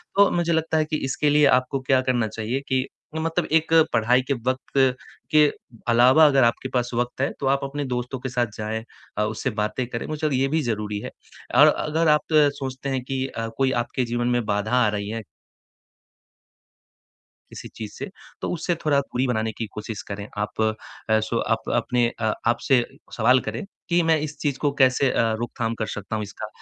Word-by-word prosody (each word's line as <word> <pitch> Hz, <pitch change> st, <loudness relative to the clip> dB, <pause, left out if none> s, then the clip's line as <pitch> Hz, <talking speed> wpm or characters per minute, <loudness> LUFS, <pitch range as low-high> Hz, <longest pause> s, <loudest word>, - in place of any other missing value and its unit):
तो 200 Hz, 0 st, +6 dB
मुझे 170 Hz, -1 st, +1 dB
लगता 160 Hz, 0 st, +1 dB
है 155 Hz, -, +2 dB
कि 155 Hz, 0 st, -2 dB
इसके 145 Hz, +3 st, 0 dB
लिए 150 Hz, 0 st, +5 dB
आपको 130 Hz, +2 st, -4 dB
क्या 130 Hz, -1 st, +5 dB
करना 125 Hz, -3 st, +1 dB
चाहिए 115 Hz, +5 st, -3 dB
कि 130 Hz, -1 st, 0 dB, 0.3 s
मतलब 165 Hz, +1 st, -1 dB
एक 160 Hz, 0 st, +2 dB, 0.2 s
पढ़ाई 120 Hz, +3 st, +3 dB
के 130 Hz, +2 st, -1 dB
वक़्त 130 Hz, +1 st, -2 dB, 0.5 s
के 150 Hz, -1 st, +6 dB, 0.5 s
अलावा 125 Hz, +7 st, +6 dB
अगर 135 Hz, -3 st, +4 dB
आपके 120 Hz, +2 st, +1 dB
पास 125 Hz, -1 st, 0 dB
वक़्त 120 Hz, +2 st, -2 dB
है, 135 Hz, -, +1 dB
तो -, -, -3 dB
आप 140 Hz, +1 st, +2 dB
अपने 140 Hz, +1 st, -3 dB
दोस्तों 125 Hz, 0 st, -3 dB
के 130 Hz, -, -4 dB
साथ 120 Hz, -1 st, 0 dB
जाएँ, 110 Hz, +1 st, -3 dB, 0.3 s
अ, 105 Hz, -, +2 dB
उससे 110 Hz, +4 st, -2 dB
बातें 105 Hz, +4 st, -1 dB
करें, 115 Hz, -1 st, -4 dB
मुझे 155 Hz, 0 st, -3 dB
लगता 145 Hz, -, 0 dB
है 130 Hz, -, +1 dB
ये 135 Hz, -, +3 dB
भी 155 Hz, +3 st, 0 dB
ज़रूरी 105 Hz, -5 st, -2 dB
है -, -, -7 dB, 0.4 s
और -, -, +8 dB
अगर 160 Hz, +2 st, +1 dB
आप 150 Hz, +1 st, +2 dB
सोचते 140 Hz, -3 st, +1 dB
हैं 135 Hz, -1 st, -1 dB
कि 135 Hz, 0 st, -2 dB
अ, 115 Hz, -3 st, -4 dB
कोई 135 Hz, -1 st, +2 dB
आपके 125 Hz, +1 st, -2 dB
जीवन 120 Hz, +1 st, -1 dB
में 120 Hz, -1 st, +1 dB
बाधा 105 Hz, +1 st, -1 dB
आ -, -, +3 dB
रही 105 Hz, -1 st, -3 dB
है 115 Hz, +1 st, -4 dB, 2.3 s
किसी -, -, -8 dB
चीज़ 110 Hz, -2 st, -7 dB
से -, -, -5 dB, 0.3 s
तो -, -, -2 dB
उससे 175 Hz, +1 st, -1 dB
थोड़ा 145 Hz, -2 st, +4 dB
दूरी 135 Hz, -2 st, -2 dB
बनाने 110 Hz, -2 st, 0 dB
की 115 Hz, -, -2 dB
कोशिश 105 Hz, -1 st, -6 dB
करें। 100 Hz, 0 st, -5 dB
आप 105 Hz, +1 st, -2 dB
अ, 110 Hz, 0 st, -1 dB
सो 110 Hz, +2 st, -1 dB, 0.2 s
आप -, -, -9 dB
अपने 120 Hz, 0 st, +1 dB
अ, 110 Hz, -1 st, +1 dB
आप 120 Hz, 0 st, +3 dB
से 125 Hz, -3 st, +4 dB, 0.3 s
सवाल 125 Hz, +3 st, +5 dB
करें -, -, -5 dB, 0.3 s
कि 175 Hz, 0 st, +4 dB
मैं 160 Hz, -1 st, +4 dB
इस 150 Hz, -1 st, -5 dB
चीज़ 140 Hz, -3 st, -1 dB
को 145 Hz, -, +1 dB
कैसे 130 Hz, +1 st, +3 dB
अ, 115 Hz, -1 st, +1 dB
रोकथाम 115 Hz, -1 st, -2 dB
कर 110 Hz, -, -1 dB
सकता 105 Hz, +1 st, -4 dB
हूँ 105 Hz, -, -2 dB
इसका? 105 Hz, +1 st, -7 dB
130 Hz, 205 wpm, -24 LUFS, 115-145 Hz, 2.3 s, और